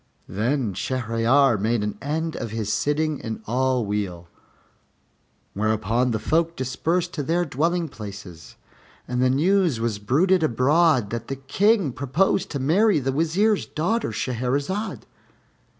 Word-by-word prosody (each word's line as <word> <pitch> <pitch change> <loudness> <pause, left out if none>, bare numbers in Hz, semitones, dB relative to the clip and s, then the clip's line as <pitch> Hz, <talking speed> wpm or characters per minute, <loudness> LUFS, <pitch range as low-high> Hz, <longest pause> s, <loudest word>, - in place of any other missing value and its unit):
Then 115 +3 -1
Shahryar 120 +3 +2
made 110 +1 0
an 105 - -3
end 160 +3 -2
of 115 - -4
his 110 -1 -2
sitting 150 0 0
in 110 -1 -6
all 125 0 0
weal, 100 -4 -3 1.3
whereupon 110 +4 0
the 115 - 0
folk 165 +8 0
dispersed 165 +8 -1
to 150 - -3
their 170 +5 0
dwelling 165 +4 0
places, 100 - -10 0.5
and 125 0 -1
the 130 - +3
news 165 - +2
was 115 -3 -2
bruited 165 - +2
abroad 145 -3 +3
that 115 0 -4
the 135 - -3
King 185 - +1
proposed 140 +11 0
to 140 - -3
marry 190 +10 +3
the 135 -2 -1
Wazir's 175 +9 +1
daughter, 200 +9 -1
Shahrazad. 140 - -2
130 Hz, 135 wpm, -23 LUFS, 115-165 Hz, 1.3 s, the